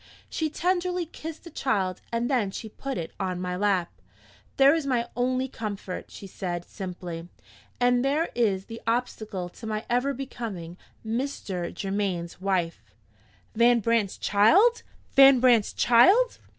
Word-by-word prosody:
She 315 -1 -1
tenderly 360 +2 0
kissed 320 0 -9
the 335 - -11
child, 195 -11 -1
and 235 +1 0
then 245 -7 +1
she 220 +3 -7
put 270 +4 -5
it 165 - -5
on 185 -1 -2
my 180 0 -3
lap. 190 -3 +1 0.7
'There 275 +1 +7
is 320 -3 -1
my 240 -3 0
only 255 +1 0
comfort,' 205 -6 -6
she - - -10
said, 175 -2 -5
simply; 175 -3 -7 0.5
'and 245 0 +3
there 290 +5 +1
is 200 -5 +1
the 230 0 -9
obstacle 220 -5 -2
to 220 +5 -10
my 215 0 -3
ever 260 +3 +1
becoming 225 -10 -6 0.3
Mr. 220 -7 -3
Germaine's 195 -4 -3
wife.'" 185 -4 -1 0.7
Van 235 +1 +4
Brandt's 225 -3 0
child! 370 - +4 0.3
Van 270 -1 +8
Brandt's 240 -4 +4
child! 385 - +4
230 Hz, 140 wpm, -26 LUFS, 190-270 Hz, 0.7 s, Van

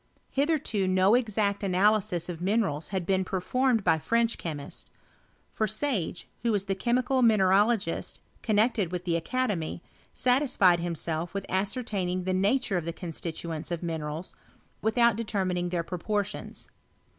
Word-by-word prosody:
Hitherto 275 - +1
no 185 +2 +4
exact 215 -4 +1
analysis 195 -2 +2
of 170 -2 -6
minerals 185 -6 0
had 190 -3 -3
been 190 +1 +2
performed 225 +5 +1
by 160 - +3
French 230 +6 +1
chemists; 145 -4 -7 0.6
for 215 - 0
Sage, 215 - -2 0.2
wha 235 - +1
was 205 -3 +1
liie 195 -1 -2
chemical 250 +3 +1
mineralogist 205 -3 +2 0.2
connected 215 -4 +2
with 180 0 -4
the 170 - 0
aeademy, 200 -8 -2 0.3
satisfied 245 -9 +3
himself 170 0 -3
with 195 - -3
ascertaining 190 -2 -1
the 185 +1 -1
nature 200 +2 +1
of 170 - -3
the 170 - -3
constituents 165 -1 -5
of 175 -1 -3
minerals, 160 0 -4 0.5
without 235 0 +3
de 230 - -2
termining 185 -4 -1
their 175 -1 -1
proportions. 200 +4 -3
195 Hz, 135 wpm, -28 LUFS, 175-225 Hz, 0.6 s, no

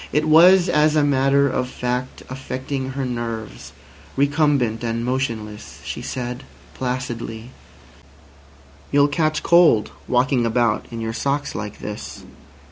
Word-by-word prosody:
It 150 +2 +1
was, 175 +4 +7
as 150 -2 +3
a 150 - +4
matter 140 0 +3
of 125 -1 -2
fact, 125 0 -4
affecting 130 +1 -5
her 135 0 -2
nerves. 115 -3 -5 0.5
Recumbent 140 -5 +1
and 115 0 -2
motionless, 115 -5 -4
she - - -5
said 125 -1 -5 0.3
placidly: 125 -2 -4 1.4
"You'll 145 0 +5
catch 155 +1 0
cold 170 -11 +4 0.2
walking 125 0 +2
about 115 -1 +1
in 115 -1 -6
your 110 0 -3
socks 140 +4 -2
like 105 0 -6
this." 105 0 -7
130 Hz, 125 wpm, -21 LUFS, 115-145 Hz, 1.4 s, was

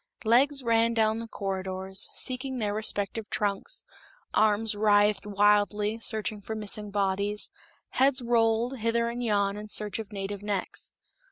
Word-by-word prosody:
Legs 270 +5 +3
ran 230 0 +2
down 220 0 +2
the 230 - -6
corridors, 190 -2 -2
seeking 260 +1 -3
their 210 -3 -1
respective 210 0 -2
trunks, 205 - -2 0.5
arms 215 +1 +3
writhed 205 -1 +3
wildly 205 +1 +2
reaching 215 -1 -3
for 220 +2 -5
missing 210 0 -2
bodies, 200 +1 0 0.4
heads 270 +1 +3
rolled 235 +1 +1
hither 235 +1 +1
and 240 +1 -4
yon 200 -3 +1
in 210 0 -7
search 210 0 +1
of 220 -2 -7
native 200 0 -5
necks. 205 -2 -4
210 Hz, 140 wpm, -28 LUFS, 205-230 Hz, 0.5 s, Legs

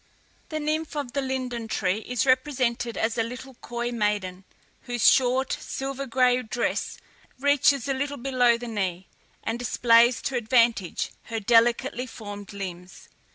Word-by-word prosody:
The 310 - -3
nymph 310 +1 -2
of 285 -5 -3
the 280 - 0
LINDEN 255 -3 -3
TREE 200 -2 0
is 245 +3 -2
represented 255 -3 +1
as 225 +1 0
a - - +3
little 250 +3 -8
coy 240 0 -3
maiden, 205 -5 -2 0.4
whose 240 -2 +2
short 260 0 +2
silver 275 0 -5
gray 250 0 +3
dress 235 +1 -2 0.4
reaches 285 -2 +3
a 275 - +1
little 285 +2 -3
below 245 -2 +2
the 240 +1 -7
knee, 190 -5 -3 0.4
and 225 +1 -2
displays 235 0 +4
to 270 - -2
advantage 230 -5 +1
her 225 -1 -3
delicately 240 +4 +2
formed 205 -3 -9
limbs. 180 -3 -8
240 Hz, 145 wpm, -26 LUFS, 225-260 Hz, 0.4 s, displays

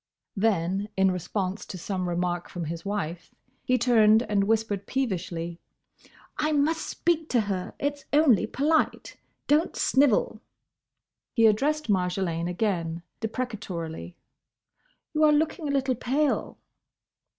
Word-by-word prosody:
then 195 -1 0
in 190 0 +4
response 185 +2 -3
to 185 - -8
some 185 0 -3
remark 175 0 -2
from 175 -2 -5
his 165 +2 -5
wife, 180 -4 -4 0.3
he 255 - +2
turned 225 -2 +5
and 200 -4 +1
whispered 210 -2 0
peevishly, 175 -9 -3 0.8
"I 305 0 +1
must 310 +3 +1
speak 325 -2 0
to 240 - +3
her; 195 -3 -4
it's 285 0 -3
only 285 - +4
polite. 310 +4 0 0.3
Don't 300 +3 +2
snivel." 260 -5 +2 0.9
He 230 -2 +4
addressed 290 +8 +2
Marjolaine 180 -3 0
again, 170 -4 -1 0.2
deprecatorily, 200 -9 -5 1.0
"You 310 0 +2
are 305 - +7
looking 310 +1 +1
a - - -1
little 270 -2 +1
pale." 270 +5 -1
215 Hz, 120 wpm, -26 LUFS, 180-275 Hz, 1.0 s, are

